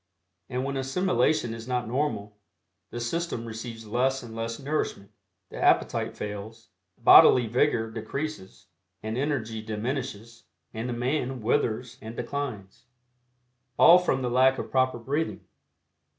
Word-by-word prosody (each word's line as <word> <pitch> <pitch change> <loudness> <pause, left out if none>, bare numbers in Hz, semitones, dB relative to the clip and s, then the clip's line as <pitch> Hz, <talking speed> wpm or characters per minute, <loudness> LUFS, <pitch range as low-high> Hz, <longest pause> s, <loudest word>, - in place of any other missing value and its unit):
And 130 0 -2
when 140 0 -2
assimilation 135 -3 +1
is 115 0 -8
not 125 -2 -1
normal, 115 -6 -2 0.5
the 120 - -6
system 120 0 -3
receives 115 0 -7
less 130 +5 0
and 115 -2 -9
less 115 0 -3
nourishment, 135 -8 -3 0.4
the - - -7
appetite - - +2
fails, 105 +2 -7 0.3
bodily 125 -2 +8
vigor 120 -1 +1
decreases, 115 0 -6 0.4
and 110 +1 -3
energy 120 -5 -2
diminishes, 115 +1 -5 0.3
and 115 +3 -4
the - - -2
man 130 +1 -1
withers 120 +2 -1
and 110 +1 -8
declines. 120 -8 -5 0.9
All 175 +2 +8
from 135 -7 0
the 125 - -1
lack 130 +2 +4
of - - -6
proper 130 -1 +2
breathing. 140 +7 -2
120 Hz, 130 wpm, -27 LUFS, 110-135 Hz, 0.9 s, bodily